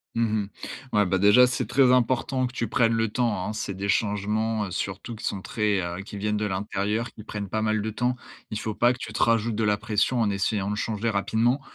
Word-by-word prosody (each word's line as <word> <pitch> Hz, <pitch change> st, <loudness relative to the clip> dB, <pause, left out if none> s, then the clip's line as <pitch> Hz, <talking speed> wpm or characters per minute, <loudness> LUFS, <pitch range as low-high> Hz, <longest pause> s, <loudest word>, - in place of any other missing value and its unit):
Mmh 115 Hz, -, +2 dB, 0.2 s
mh. 100 Hz, -, -9 dB, 0.4 s
Ouais 105 Hz, -1 st, +4 dB
bah, 95 Hz, -, +1 dB
déjà 105 Hz, +6 st, +6 dB
c'est 125 Hz, 0 st, -1 dB
très 130 Hz, +1 st, +4 dB
important 130 Hz, +1 st, +2 dB
que 125 Hz, -, -4 dB
tu 115 Hz, -2 st, -2 dB
prennes 115 Hz, -1 st, +2 dB
le 115 Hz, -1 st, +1 dB
temps 105 Hz, -6 st, 0 dB
hein. -, -, -2 dB
C'est 100 Hz, -, -3 dB
des 100 Hz, +2 st, -4 dB
changements 105 Hz, +1 st, 0 dB
surtout 100 Hz, +5 st, -4 dB
qui 110 Hz, -, -8 dB
sont 95 Hz, -, -2 dB
très 105 Hz, -1 st, 0 dB
heu, 85 Hz, +2 st, -4 dB
qui 105 Hz, -, -8 dB
viennent 105 Hz, +1 st, -1 dB
de 105 Hz, -, -1 dB
l'intérieur, 105 Hz, +4 st, -2 dB
qui 105 Hz, -, -11 dB
prennent 105 Hz, -2 st, -5 dB
pas 110 Hz, +3 st, -1 dB
mal 110 Hz, -1 st, +1 dB
de 110 Hz, -, -2 dB
temps. 125 Hz, +3 st, 0 dB, 0.4 s
Il 105 Hz, -, -2 dB
faut 110 Hz, -1 st, -4 dB
pas 120 Hz, +3 st, +4 dB
que 125 Hz, -, -11 dB
tu 115 Hz, -, -6 dB
te 110 Hz, -, -3 dB
rajoutes 115 Hz, -1 st, +2 dB
de 110 Hz, -, 0 dB
la 105 Hz, -1 st, +3 dB
pression 105 Hz, +4 st, +1 dB
en 110 Hz, -, +2 dB
essayant 100 Hz, 0 st, 0 dB
de 105 Hz, -, -1 dB
changer 110 Hz, +1 st, -1 dB
rapidement. 115 Hz, +5 st, +1 dB
110 Hz, 240 wpm, -26 LUFS, 100-115 Hz, 0.4 s, déjà